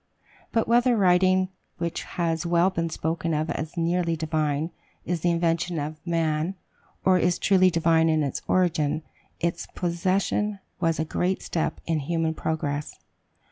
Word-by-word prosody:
But 225 - +1
whether 240 +1 +4
writing, 185 -1 +4 0.3
which 170 -1 -2
has 165 -2 -2
well 175 +2 +3
been 165 -2 -1
spoken 165 0 -2
of 155 +2 -1
as 155 +2 -5
"nearly 170 0 +1
divine," 155 0 -1 0.3
is 175 -2 -2
the 175 - +2
invention 170 0 0
of 155 +1 -4
man, 165 +1 0 0.5
or 185 -1 +5
is 175 -1 +2
truly 185 -2 +4
divine 165 -1 +3
in 155 -1 +2
its 140 - -2
origin, 160 -4 +1 0.4
its 170 0 -2
possession 190 +4 0 0.2
was 165 -2 +1
a 160 - +1
great 180 +4 -1
step 160 - -2
in 165 -2 0
human 160 +2 -1
progress. 150 -2 -3
170 Hz, 145 wpm, -26 LUFS, 160-180 Hz, 0.5 s, or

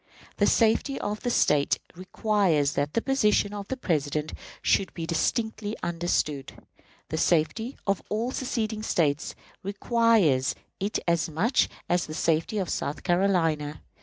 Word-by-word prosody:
The - - +3
safety 230 +4 +2
of 210 +1 -3
the 245 - -2
State 150 -10 +3 0.2
requires 185 -5 +1
that 145 +1 -1
the 230 - +1
position 210 -6 +2
of 200 -1 -6
the 265 - -3
President 150 - -1 0.3
should 195 - +2
be 165 -2 -4
distinctly 220 +5 -1
understood. 165 -5 -1 0.6
The 160 - -2
safety 200 - +1
of 195 -1 +1
all 225 +4 -1
seceding 225 -5 -2
States 155 -8 0 0.3
requires 200 - +2 0.2
it 200 +2 -1
as 170 0 +1
much 195 - +2 0.2
as 175 -1 +1
the 155 - -6
safety 165 +7 +1
of 190 -3 -1
South 145 - -3
Carolina. 165 -5 +1
185 Hz, 135 wpm, -27 LUFS, 155-220 Hz, 0.6 s, The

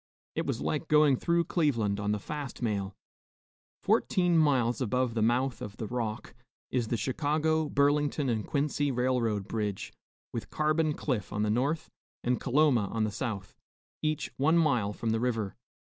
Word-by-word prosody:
It - - -2
was - - -2
like 155 +1 -1
going 150 -2 +5
through 170 +6 +1
Cleveland 115 - +1
on 105 0 0
the 105 - +1
fast 140 +3 -6
mail. 100 -4 -1 0.9
Fourteen 180 -2 +2
miles 130 -7 +3
above 125 0 0
the 110 - -1
mouth 125 +3 +1
of 105 -1 -7
the 110 - -4
Rock, 115 -1 -4 0.4
is 120 -3 0
the 120 - 0
Chicago, 155 +6 0
Burlington 145 0 +2
and 110 -4 0
Quincy 145 0 0
railroad 120 -5 0
bridge, 105 -3 -3 0.4
with 115 - -5
Carbon 155 0 +1
Cliff 120 -10 -2
on 105 +1 -1
the 105 - +1
north 140 +8 0 0.4
and 125 0 +1
Coloma 130 -5 +3
on 115 +1 -1
the 110 - 0
south, 100 -4 -4 0.5
each 155 -1 -1
one 155 +5 +3
mile 125 -11 +2
from 110 +2 -2
the 110 - +1
river. 115 -5 -1
125 Hz, 160 wpm, -29 LUFS, 110-150 Hz, 0.9 s, going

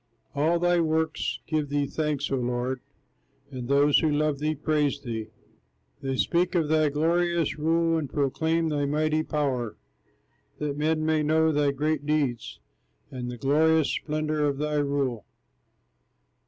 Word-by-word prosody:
All 155 +4 +2
thy 175 0 +2
works 160 -1 -1
give 155 -3 -1
thee 145 0 0
thanks, 150 -1 -2
O - - +2
Lord, 125 +1 -2 0.7
And 125 -2 -6
those 140 +1 +4
who 160 - +1
love 150 -1 0
thee 155 +1 0
praise 150 -1 0
thee, 115 -5 -5 0.7
They 135 -1 -2
speak 180 +5 +1
of 160 -4 +1
thy 155 -1 +3
glorious 165 +1 0
rule, 165 +1 +2
And 145 -4 -4
proclaim 160 +3 0
thy 145 -2 0
mighty 155 +2 +1
power, 135 -8 -2 0.8
That 150 -1 -3
men 155 +1 0
may 160 -1 +2
know 160 +1 +3
thy 145 -1 +2
great 145 +1 -1
deeds, 140 -7 -1 0.5
And 125 -2 -5
the 125 - -6
glorious 155 +4 +3
splendor 155 -1 -1
of 140 -1 -1
thy 150 +1 -1
rule. 140 -6 -1
150 Hz, 145 wpm, -26 LUFS, 140-160 Hz, 0.8 s, those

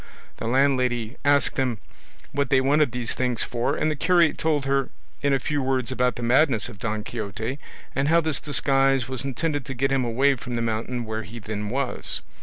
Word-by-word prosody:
The 115 - -4
landlady 125 -2 +1
asked 145 0 +3
them 130 -4 0 0.5
what 140 -1 -1
they 135 - +5
wanted 140 0 +3
these 125 -2 -2
things 125 -3 +1
for, 120 0 -1
and 155 - +1
the - - -1
curate 170 +1 +3
told 150 -3 +1
her 135 -1 +1 0.3
in 140 - +2
a 135 - +4
few 145 +2 -2
words 130 -2 0
about 125 -2 +1
the 120 - -6
madness 125 -1 +3
of 105 -5 -12
Don 110 -3 -2
Quixote, 110 +4 -4 0.3
and 140 +1 0
how 165 +2 +5
this 160 -3 -1
disguise 135 -3 +2
was 130 0 -3
intended 145 +2 -2
to 135 - -5
get 135 +2 0
him 135 -1 +2
away 135 +4 +2
from 120 0 -5
the 115 - -1
mountain 115 +2 -2
where 110 0 -3
he 110 +3 -9
then 105 -1 -4
was. 135 +2 -2
130 Hz, 205 wpm, -24 LUFS, 120-140 Hz, 0.5 s, they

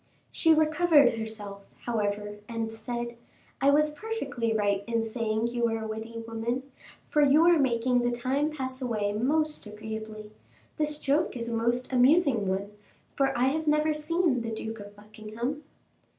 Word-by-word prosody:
She 325 -1 +4
recovered 310 -2 +4
herself, 215 -3 -6 0.2
however, 210 -2 -2
and 225 -1 -3
said, 235 +1 -5 0.4
"I 275 - +5
was 300 +1 +4
perfectly 285 - -3
right 205 -2 +1
in 230 -1 0
saying 225 0 -1
you 240 0 0
were 225 -1 0
a 220 - -5
witty 225 +1 -6
woman, 230 +3 -2 0.4
for 300 - +2
you 290 +3 +5
are 345 -2 +5
making 250 -2 +2
the 240 0 +1
time 260 +5 0
pass 260 -3 -5
away 215 -5 -1
most 300 +5 0
agreeably. 215 0 -7 0.5
This 300 -1 0
joke 285 0 +1
is 235 0 -4
a - - -3
most 235 +3 0
amusing 255 - +4
one, 195 +2 -2 0.4
for 275 -1 +2
I 255 +2 +3
have 315 +2 -2
never 300 +1 +3
seen 305 -3 +1
the 230 - -4
Duke 225 0 -5
of 205 0 -11
Buckingham." 215 +6 -6
235 Hz, 160 wpm, -28 LUFS, 220-290 Hz, 0.5 s, I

